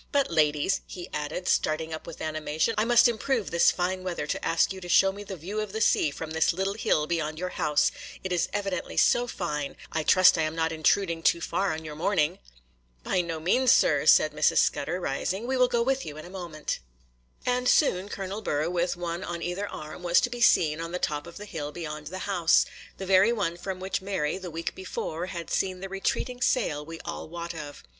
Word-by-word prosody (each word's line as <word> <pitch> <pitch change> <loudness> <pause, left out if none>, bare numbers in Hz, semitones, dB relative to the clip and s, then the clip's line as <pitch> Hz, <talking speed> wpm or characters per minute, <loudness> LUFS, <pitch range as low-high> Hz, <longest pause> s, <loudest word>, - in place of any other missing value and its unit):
But, 280 -8 +1
ladies,' 155 +3 +2
he 175 -1 -8
added, 150 +5 -3
starting 160 +1 +1
up 155 - -7
with 165 - -9
animation, 155 +5 -1
'I 215 - +2
must 240 +1 +6
improve 235 - -1
this 170 - +5
fine 185 +1 -1
weather 175 -5 -3
to - - -3
ask 165 +3 +2
you 190 - -9
to 175 - -8
show 195 +2 +5
me 200 +1 -9
the 195 -1 -7
view 190 +7 -4
of 210 -2 -6
the 220 - -2
sea 160 - +3
from 155 +2 -7
this 160 0 +2
little 190 +3 -1
hill 155 -7 +1
beyond 155 -1 -2
your 180 +2 -3
house, 150 -4 +1 0.3
it 190 - -4
is 175 -1 +1
evidently 195 -3 -3
so 245 0 +4
fine;—I 155 -4 -4
trust 180 +2 +6
I - - +3
am 155 0 -1
not 165 0 0
intruding 165 +1 +1
too 170 - +3
far 195 +3 -1
on 160 0 -5
your 155 - -6
morning?' 160 -2 +1 0.6
'By 180 - +1
no 165 -2 -4
means, 245 +10 +3
sir,' - - +3
said - - +6
Mrs. - - +2
Scudder, 180 - +1
rising; 185 +6 -2
'we 260 +2 -1
will 250 -1 +4
go 235 -1 +1
with 270 +2 0
you 150 0 -7
in 155 - -8
a 175 - -11
moment.' 170 -5 -4 0.7
And 250 0 +1
soon 200 - +3
Colonel 195 +2 -5
Burr, 155 -4 -1
with 175 0 0
one 175 +1 -4
on 170 0 -5
either 180 +4 -3
arm, 155 +1 -8
was 175 0 +4
to 245 - -1
be 240 -1 -5
seen 160 -7 +4
on 165 +1 -5
the - - 0
top 150 -3 -2
of 170 - -10
the 210 - -8
hill 150 -7 -5
beyond 150 -2 -6
the 185 +4 -5
house,—the 185 +1 +1
very 190 +4 +5
one 170 -8 -1
from 185 +1 -5
which 190 +1 -2
Mary, 190 -4 -2
the 185 -2 -7
week 165 +1 -4
before, 180 -2 -4
had 170 -2 -6
seen 185 -1 0
the 195 +1 -6
retreating 245 +6 -2
sail 155 - +1
we 165 +2 -9
all 170 -2 -6
wot 170 0 -5
of. 150 -3 -8
175 Hz, 220 wpm, -27 LUFS, 160-195 Hz, 0.7 s, must